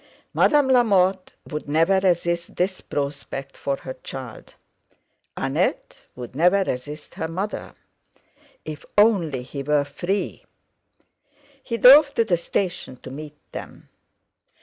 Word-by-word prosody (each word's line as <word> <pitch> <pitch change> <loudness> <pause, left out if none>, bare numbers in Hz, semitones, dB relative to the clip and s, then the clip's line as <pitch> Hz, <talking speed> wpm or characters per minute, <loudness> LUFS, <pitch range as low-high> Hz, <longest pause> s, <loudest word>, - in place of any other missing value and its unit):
Madame 295 -3 +4
Lamotte 195 -7 +3
would 150 -2 -6
never 165 +6 +3
resist 170 -2 0
this 185 +1 -1
prospect 140 -1 -5
for 140 - -2
her 130 - -8
child; 130 -4 -9 0.8
Annette - - -2
would 125 0 -9
never 180 +6 +4
resist 150 0 -5
her 160 - -3
mother. 190 +6 -5 0.9
If 155 -1 -7
only 180 - +3
he 140 +2 -6
were 145 0 +1
free! 180 +7 -3 1.2
He 230 -3 -3
drove 280 +4 +8
to 230 - +3
the 180 -5 +2
station 175 -5 -3
to 130 - -8
meet 150 +2 -9
them. - - -9
170 Hz, 120 wpm, -23 LUFS, 145-195 Hz, 1.2 s, drove